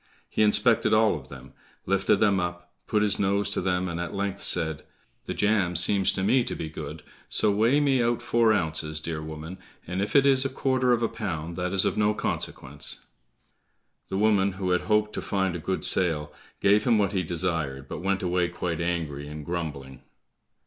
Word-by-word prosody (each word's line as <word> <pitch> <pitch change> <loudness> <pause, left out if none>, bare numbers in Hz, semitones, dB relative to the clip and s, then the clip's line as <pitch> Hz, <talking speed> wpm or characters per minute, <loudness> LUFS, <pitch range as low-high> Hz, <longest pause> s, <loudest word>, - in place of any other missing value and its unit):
He - - -2
inspected 110 +1 +3
all 110 0 +4
of 65 -4 -9
them, 65 0 -12 0.3
lifted - - +2
them 100 -2 +2
up, 90 0 -5
put 105 -1 +2
his 105 -2 +1
nose 100 +1 +1
to - - 0
them, 90 0 0
and 85 -1 -4
at 85 +3 -4
length 100 0 -2
said, 80 -2 -1 0.5
"The - - -3
jam 100 -4 +1
seems 95 +3 +3
to 95 - -2
me 125 +5 +3
to - - -3
be 80 - -5
good, - - -8 0.3
so 105 - +3
weigh 115 +8 +3
me 135 -3 +2
out 120 0 0
four 115 -1 +3
ounces, 80 -5 -1
dear 80 0 -4
woman, 80 +3 -8 0.3
and 90 +2 -3
if 100 - -3
it 140 -1 +6
is 135 -1 +5
a 135 - -1
quarter 130 -1 +1
of 120 -1 +2
a - - +3
pound 85 -8 -5
that 90 0 -2
is 95 -1 +3
of - - 0
no 105 0 +2
consequence." 70 -5 -4 1.1
The 95 - -2
woman 100 -2 +3
who 95 -1 -2
had 90 - +2
hoped 105 0 +1
to - - -3
find 95 -3 -1
a - - -4
good 95 +4 -3
sale, 80 -5 +1 0.3
gave 100 +1 +4
him 120 -3 +4
what 100 -2 +1
he 95 - 0
desired, 80 -6 -2
but - - -6
went 95 +1 -1
away 90 0 +1
quite 85 -1 -3
angry 80 -5 -3
and 75 0 -8
grumbling. 70 -6 -5
95 Hz, 200 wpm, -26 LUFS, 80-105 Hz, 1.1 s, it